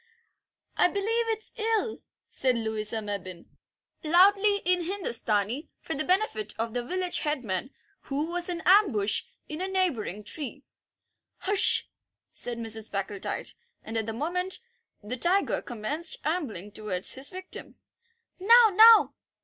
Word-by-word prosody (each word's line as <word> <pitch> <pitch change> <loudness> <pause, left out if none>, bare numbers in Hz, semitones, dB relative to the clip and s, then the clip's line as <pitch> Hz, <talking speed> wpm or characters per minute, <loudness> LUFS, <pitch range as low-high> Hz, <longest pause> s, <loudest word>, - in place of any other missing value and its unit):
"I - - +5
believe 450 +5 0
it's 440 -1 -3
ill," 445 0 0 0.3
said 255 -2 +1
Louisa 220 -1 0
Mebbin, 185 -4 -6 0.6
loudly 395 +5 +5
in 360 0 +4
Hindustani, 235 - -1
for - - -4
the 280 - -1
benefit 335 - 0
of 225 0 -3
the 245 - -2
village 365 +6 -1
headman, 260 - -2 0.4
who 285 +2 -2
was 350 +1 -3
in 340 -2 -4
ambush 340 - +3 0.2
in 305 +2 -6
a 375 - -1
neighbouring 275 - -1
tree. 280 +3 -7 0.8
"Hush!" 400 0 +2 0.5
said 240 -1 -1
Mrs. 225 -1 -4
Packletide, 200 0 -3 0.3
and 225 - -7
at 220 -1 0
that 225 - -3
moment 360 +9 -1 0.5
the 235 +5 -4
tiger 365 +8 +1
commenced 285 +8 -3
ambling 255 - -3
towards 200 -4 -1
his 265 +2 -2
victim. 370 0 -8 0.6
"Now, 460 +4 +7
now!" 445 +2 +8
300 Hz, 130 wpm, -27 LUFS, -, 0.8 s, now